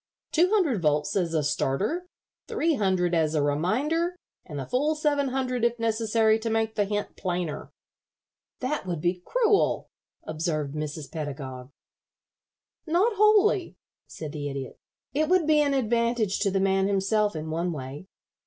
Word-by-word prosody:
Two 345 +3 +4
hundred 340 - +2
volts 150 -1 +1
as 170 -4 0
a 155 - +2
starter, 195 - -1 0.4
three 335 -9 +1
hundred 185 - +1
as 160 -2 +2
a 150 - +2
reminder, 265 - 0 0.3
and 150 -4 -8
the 135 - -4
full 295 - +1
seven 290 -2 +1
hundred 255 -2 -1
if 235 0 +2
necessary 225 -1 +2
to 225 +1 -3
make 225 0 0
the 205 -2 +1
hint 205 +1 -3
plainer." 175 -4 -3 0.9
"That 255 -5 -2
would 175 -3 -2
be 175 +3 -1
cruel," 445 - +2 0.3
observed 155 -3 -2
Mrs. 150 -1 -5
Pedagog. 135 -5 -6 1.2
"Not 365 +9 +3
wholly," 425 -2 +4 0.3
said 155 -2 -7
the 145 -1 -4
Idiot. 135 -2 -6 0.3
"It 305 +2 +1
would 365 -3 +4
be 305 -1 +4
an 285 -1 +2
advantage 235 -4 +1
to 200 - +2
the 195 0 0
man 195 0 +2
himself 200 +1 +1
in 155 0 -4
one 170 +2 -1
way. 145 +3 -7
205 Hz, 155 wpm, -26 LUFS, -, 1.2 s, Two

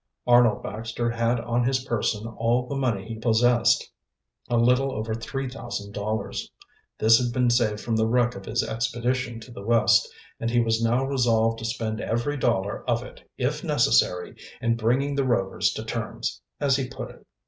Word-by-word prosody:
Arnold 120 -2 +4
Baxter 115 +2 -3
had 115 +1 +1
on 120 +1 0
his 130 +1 +1
person 110 -3 -1
all 115 +2 0
the 140 - -4
money 115 -7 -1
he 115 -1 -6
possessed, 120 +1 +3 0.6
a 120 - +2
little 125 +3 +3
over 110 -2 -3
three 130 +4 -4
thousand 120 -5 -6
dollars. 105 +2 -3 0.5
This 115 +1 +5
had 120 - -1
been 125 0 +2
saved 110 -3 +1
from 115 - -1
the 110 0 +2
wreck 120 +1 +2
of 95 0 -9
his 115 +1 0
expedition 120 +2 -2
to 120 - -12
the 110 - -9
West, 115 +1 +3 0.3
and 115 - -1
he 120 +1 +2
was 115 -1 +1
now 120 +3 +2
resolved 115 -4 +2
to 115 - -5
spend 110 -2 -3
every 120 +6 -1
dollar 110 -7 0
of - - +1
it, - - -14
if - - -1
necessary, 90 0 +2 0.2
in 115 0 +1
bringing 125 +5 +1
the 140 0 +1
Rovers 95 -7 +1
to - - -6
terms, - - -4 0.2
as 140 -2 +2
he 135 -2 -2
put - - -7
it. - - -19
115 Hz, 180 wpm, -25 LUFS, 110-125 Hz, 0.6 s, This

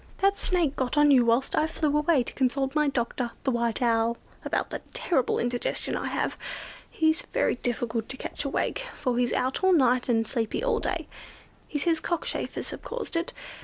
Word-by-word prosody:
That 395 +1 +3
Snake 345 -8 +2
got 260 +2 -1
on 295 0 +6
you 255 -3 +6
whilst 235 +3 +2
I 310 - +3
flew 305 -2 0
away 300 -3 +3
to - - -7
consult 270 +1 0
my 300 -1 +3
doctor, 240 -2 -1
the 265 - +1
White 235 0 0
Owl, 230 0 +2 0.3
about - - -1
the - - -4
terrible 265 -9 +1
indigestion 245 0 -1
I - - -2
have. - - -1 0.5
He's 315 0 +2
very - - +2
difficult 235 -2 -2
to 265 - -4
catch - - -5
awake; 295 - -1
for 250 -3 -1
he's 245 -1 +2
out 260 +7 0
all 375 0 +6
night 255 -5 +3
and 225 -2 +2
sleepy 230 - -1
all - - +2
day. - - -2 0.6
He 295 - -3
says 325 +2 +1
cockchafers 345 0 -2
have - - -7
caused 480 -7 -5
it. 335 +1 0
265 Hz, 190 wpm, -27 LUFS, 240-315 Hz, 0.6 s, on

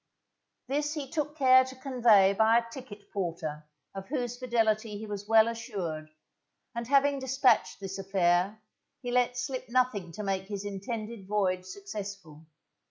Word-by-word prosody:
This 295 +3 -1
he 290 -3 -4
took 300 -2 -2
care 260 -2 +7
to 260 0 -9
convey 235 -7 +4
by 220 +3 +4
a 235 - +1
ticket 210 -6 -11
porter 160 -5 -4 0.3
of 195 0 -7
whose 245 -4 -2
fidelity 225 -4 0
he 220 - -7
was 205 -1 -6
well 220 0 +6
assured, 195 -10 -4 0.6
and 235 0 -4
having 280 +1 +3
despatched 265 -3 +2
this 195 0 -6
affair, 190 +2 +1 0.4
he 245 - -3
let 245 0 +2
slip 255 -1 -4
nothing 235 -8 +1
to 210 - -6
make 190 -1 -2
his 200 -1 -5
intended 210 +1 -5
voyage 185 -3 0
successful. 195 -5 -8
215 Hz, 150 wpm, -29 LUFS, 195-250 Hz, 0.6 s, care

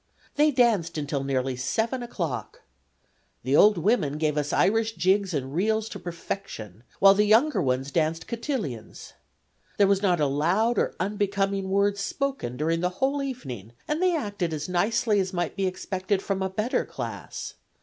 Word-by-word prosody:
They 300 +1 +4
danced 225 - +2
until 145 -2 -2
nearly 130 -1 -1
7 220 - -1
o'clock. 170 - -5 0.8
The 130 +3 +1
old 210 +4 +6
women 165 - +1
gave 155 -1 0
us 150 -1 -1
Irish 225 +2 +2
jigs 195 0 +2
and 135 -4 -3
reels 220 +5 +1
to - - -7
perfection, 165 - -6 0.2
while 195 0 +7
the 210 +1 +2
younger 240 +9 +4
ones 130 +1 -1
danced 160 +1 0
cotillions. 230 - -5 0.6
There 205 - +5
was 195 0 +2
not 180 -4 +2
a 150 - +3
loud 180 +12 +1
or - - 0
unbecoming 195 0 -1
word 200 +1 +2
spoken 240 - -3
during 165 +2 0
the 180 +1 +1
whole 275 +2 +1
evening, 130 - -6
and 300 +3 -1
they 365 -2 +3
acted 200 - -2
as 150 0 -4
nicely 210 +4 +1
as 190 0 -1
might 175 -2 -2
be 195 -1 0
expected 190 +1 -2
from 195 -1 -2
a 190 - 0
better 215 +6 0
class. - - -6
190 Hz, 165 wpm, -26 LUFS, 155-220 Hz, 0.8 s, while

